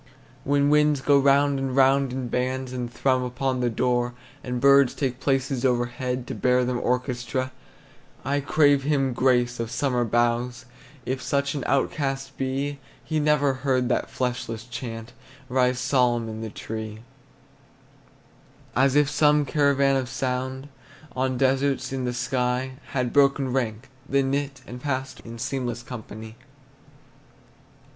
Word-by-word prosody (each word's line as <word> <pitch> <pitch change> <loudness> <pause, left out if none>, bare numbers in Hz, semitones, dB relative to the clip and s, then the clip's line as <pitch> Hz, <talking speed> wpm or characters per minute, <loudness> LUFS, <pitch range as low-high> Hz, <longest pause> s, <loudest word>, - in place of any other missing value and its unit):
When 145 +1 +2
winds 150 -1 +4
go 140 +1 +4
round 140 0 +3
and 135 -1 -2
round 135 0 +4
in 130 -1 -3
bands, 130 +1 -2
And 120 -2 -4
thrum 130 0 +1
upon 125 +1 -2
the 125 -1 +1
door, 120 +1 0 0.3
And 125 -1 -3
birds 140 -1 +5
take 130 -3 -2
places 135 -1 0
overhead, 125 0 -1
To - - -5
bear 125 0 +2
them 125 0 -1
orchestra, 125 +1 -1 0.7
I 140 +2 +1
crave 145 -1 +4
him 135 -2 +1
grace, 125 -1 +2
of 115 -1 -2
summer 125 0 0
boughs, 120 +2 0 0.4
If 130 0 -2
such 140 +1 0
an 140 -4 -3
outcast 135 0 -1
be, 135 +2 -2 0.3
He 155 -1 -1
never 150 -2 +3
heard 130 -2 0
that - - 0
fleshless 120 -3 -3
chant 115 -2 -7 0.4
Rise 125 0 +2
solemn 125 -3 +1
in 110 0 -6
the 110 - -4
tree, 110 0 -6 1.7
As 130 +2 +3
if 145 -1 +5
some 150 0 +3
caravan 140 -2 +3
of 130 -2 -2
sound 130 +1 -3 0.5
On 130 0 0
deserts, 135 0 +1
in 130 -1 -2
the 125 - -1
sky, 125 0 -1 0.2
Had 125 -3 -1
broken 140 -2 +3
rank, 115 -2 -2 0.2
Then 135 -1 +2
knit, 140 0 -2
and 125 +1 -9
passed 130 -2 -3
In 115 0 -10
seamless 120 0 -3
company. 110 -2 -9
130 Hz, 140 wpm, -25 LUFS, 125-140 Hz, 1.7 s, birds